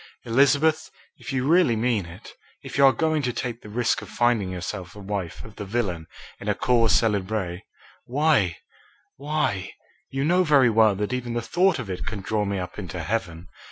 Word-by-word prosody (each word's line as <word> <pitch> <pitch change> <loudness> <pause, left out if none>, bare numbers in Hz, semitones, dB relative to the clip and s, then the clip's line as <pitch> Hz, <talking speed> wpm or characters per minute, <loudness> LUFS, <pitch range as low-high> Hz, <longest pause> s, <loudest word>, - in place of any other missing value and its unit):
"Elizabeth, 140 +6 +3 0.3
if - - -7
you 135 0 -1
really 165 -7 +4
mean 110 -5 0
it, 85 +1 -12 0.3
if - - -8
you 140 - +4
are 135 - +8
going 155 +1 0
to 125 -3 -1
take 120 0 -4
the 105 - -11
risk 115 +1 0
of 110 - -10
finding 120 -5 +1
yourself 90 +1 -5
the 105 - -11
wife 100 -4 -5
of 110 -2 -13
the 105 - -5
villain 95 -6 -2 0.3
in - - -4
a - - +2
cause 115 -3 +2
célèbre, 100 -4 0 0.4
why 135 - +2 0.6
why 140 -10 -1 0.4
you 135 +1 -2
know 180 +3 +3
very 140 -7 +5
well 110 -2 +4
that 105 +5 -2
even 125 -2 -3
the - - +1
thought 175 - +2
of 125 -6 -5
it 95 -2 -4
can 105 - -4
draw 105 +1 -1
me 100 0 -2
up 90 +2 -6
into 90 -3 -5
heaven. 85 -3 -3
115 Hz, 195 wpm, -24 LUFS, 100-135 Hz, 0.6 s, are